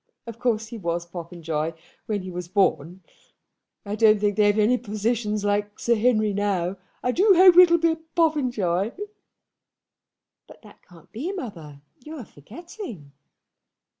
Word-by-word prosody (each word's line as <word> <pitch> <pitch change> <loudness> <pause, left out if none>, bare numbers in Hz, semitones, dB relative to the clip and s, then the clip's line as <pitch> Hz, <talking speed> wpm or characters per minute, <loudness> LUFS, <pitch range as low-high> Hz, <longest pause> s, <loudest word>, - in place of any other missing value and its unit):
Of 230 -1 -9
course 225 -3 -1
he 230 -1 -8
was 170 -2 -3
Popenjoy 165 -2 -5 0.3
when 205 -3 -2
he 185 - -7
was 175 -1 -6
born. 185 -2 0 0.8
I 200 - -5
don't 215 -1 +4
think 205 -1 0
they've 205 -1 +3
any 220 +4 +3
physicians 215 -1 -2
like 205 0 -1
Sir 235 - +1
Henry 215 -2 +1
now. 195 -2 -1 0.3
I 250 - +1
do 385 - +4
hope 365 0 +7
it'll 345 -2 +8
be 335 0 +2
a 320 - -3 0.2
Popenjoy." 245 - 0 1.5
"But - - -17
that 210 - -17
can't 170 -3 -20
be, 285 - -4
mother. 165 - -8 0.2
You 310 +3 -9
are 260 -7 -8
forgetting." 225 - -11
210 Hz, 145 wpm, -24 LUFS, 180-245 Hz, 1.5 s, it'll